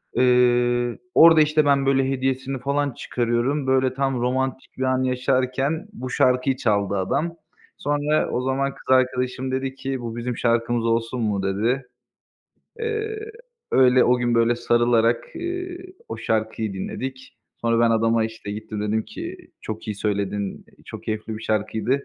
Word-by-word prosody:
Eee, 120 -1 +3 0.2
orada, 165 -1 +8
işte, 150 0 +3
ben 140 -1 +3
böyle 135 -1 +2
hediyesini 130 0 -1
falan 140 +2 0
çıkarıyorum. 120 +4 -1
Böyle, 130 -1 +2
tam 135 -2 -1
romantik 130 +1 -2
bir 130 - -2
an 130 0 +1
yaşarken 130 +6 0
bu 130 -10 -6
şarkıyı 130 +1 +2
çaldı 100 -5 +1
adam. 165 - -1 0.4
Sonra 145 +1 0
o 125 - -1
zaman 135 +1 0
kız - - -16
arkadaşım 130 0 +1
dedi 130 0 -2
ki, 135 -1 -4
"Bu 115 -1 -5
bizim 120 0 -3
şarkımız 115 0 +1
olsun 115 +2 0
mu?" 105 -3 0
dedi. 115 +7 0 0.9
Eee, 440 -1 -2 0.5
öyle 130 -1 +5
o 125 +1 +4
gün, 120 -1 +1
böyle, 115 +1 +3
sarılarak, 120 -1 +2
ııı, 355 +1 -4 0.3
o 115 - -5
şarkıyı 110 -1 -1
dinledik. 130 +7 -6 0.2
Sonra 115 0 +2
ben 115 - +3
adama 115 0 +2
işte 110 -2 -7
gittim, 105 0 -5
dedim 110 +1 0
ki, 340 +9 -7 0.2
"Çok 110 0 -6
iyi 105 - -2
söyledin, 100 -1 -2 0.2
çok 110 0 -9
keyifli 110 -1 -4
bir 110 - -10
şarkıydı, 110 +2 -1
125 Hz, 150 wpm, -23 LUFS, 115-135 Hz, 0.9 s, orada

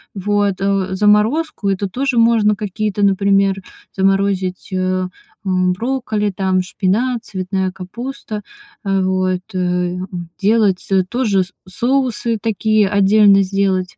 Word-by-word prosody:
Вот, 205 0 +1
э, 195 -1 0
заморозку- 210 +6 +2
это 195 0 -1
тоже 260 +4 -1
можно 225 -2 +4
какие-то, 210 0 -1
например, 195 0 +3 0.4
заморозить, 195 -1 0
э, 185 0 -1 0.3
брокколи, 205 +4 0
там, 190 -1 0
шпинат, 220 +7 -1
цветная 190 -1 -2
капуста. 220 +3 -7 0.4
Э, 195 -1 +1
вот, 185 -1 0
э, - - -3
м, 180 0 -2
делать, 205 -2 +2
э, 190 -1 +4
тоже 215 -7 +1
с 185 - -11 0.2
соусы 240 +1 0
такие, 215 -1 +1
отдельно 200 0 +5
сделать. 190 -1 -1
195 Hz, 115 wpm, -18 LUFS, 185-215 Hz, 0.4 s, отдельно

